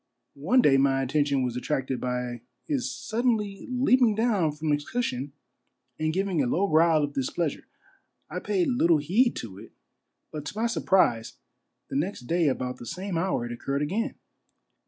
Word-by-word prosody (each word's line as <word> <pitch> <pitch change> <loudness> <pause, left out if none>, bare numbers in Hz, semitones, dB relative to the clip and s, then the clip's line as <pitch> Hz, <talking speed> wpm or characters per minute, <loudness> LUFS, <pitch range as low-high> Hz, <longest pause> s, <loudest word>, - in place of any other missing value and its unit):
One 245 - +4
day 135 -2 +5
my 135 0 +2
attention 140 0 +1
was 125 -1 -2
attracted 130 0 -2
by 125 -1 -3 0.2
his 270 -5 -1
suddenly 220 -5 -1
leaping 255 -3 +3
down 210 -8 +2
from 150 +1 -2
his 145 0 +1
cushion 145 - -3 0.7
and 155 0 +1
giwng 190 -2 0
a - - 0
low 190 +10 +1
growl 160 -2 +4
of 145 0 -3
displeasure. 140 +3 -2 0.6
I - - -4
paid 360 -4 0
little 170 -10 +3
heed 200 - +2
to 100 -4 -7
it, 110 - -13 0.6
but 150 -2 -5
to 205 - -6
my 225 - +1
surprise 185 - +2 0.6
the - - -1
next 180 +5 -2
day 165 +6 +1
about 125 -2 -1
the 120 - -10
same 185 +2 -4
hour 165 -7 0
it 120 - -6
occurred 140 +4 -2
again. 215 - -2
155 Hz, 165 wpm, -27 LUFS, 135-210 Hz, 0.7 s, day